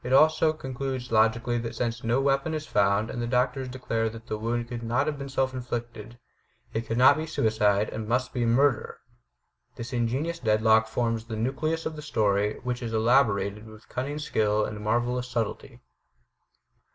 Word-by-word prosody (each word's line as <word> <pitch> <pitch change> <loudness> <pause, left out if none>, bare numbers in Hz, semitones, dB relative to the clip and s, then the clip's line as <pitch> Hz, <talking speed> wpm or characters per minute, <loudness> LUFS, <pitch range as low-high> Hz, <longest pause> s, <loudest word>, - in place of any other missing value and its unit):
It 125 - -2
also 155 +2 +5
concludes 130 -4 -5
logically 115 +2 +2
that 115 0 -5
since 120 0 -2
no 115 +3 +2
weapon 140 +3 +1
is 155 -1 -4
found 100 -2 +1
and 120 - -4
the 120 - -2
doctors 125 +2 0
declare 115 -3 -2
that 115 +1 -11
the 110 - -3
wound 115 +2 -2
could 120 -1 -5
not 120 +4 0
have 150 -2 -3
been 140 0 -6
self 130 0 0
inflicted, 120 -2 -6 0.6
it 115 +1 -3
could 115 - -2
not 130 +4 +7
be 160 +1 -3
suicide 105 -7 +2
and 110 -1 -5
must 125 +2 0
be 125 - 0
murder! 125 +2 +2 0.8
This 120 +2 -7
ingenious 130 +8 -1
deadlock 110 -1 +3
forms 115 0 -1
the 115 -1 -5
nucleus 155 +8 -1
of 160 - -3
the 150 - -7
story 105 -7 +1
which 125 0 -3
is 115 -2 -3
elaborated 110 -3 +2
with 110 0 -15
cunning 140 +4 -3
skill 105 -7 +1
and 105 0 -6
marvelous 120 +3 0
subtlety. 115 -4 -4
120 Hz, 175 wpm, -27 LUFS, 110-130 Hz, 0.8 s, not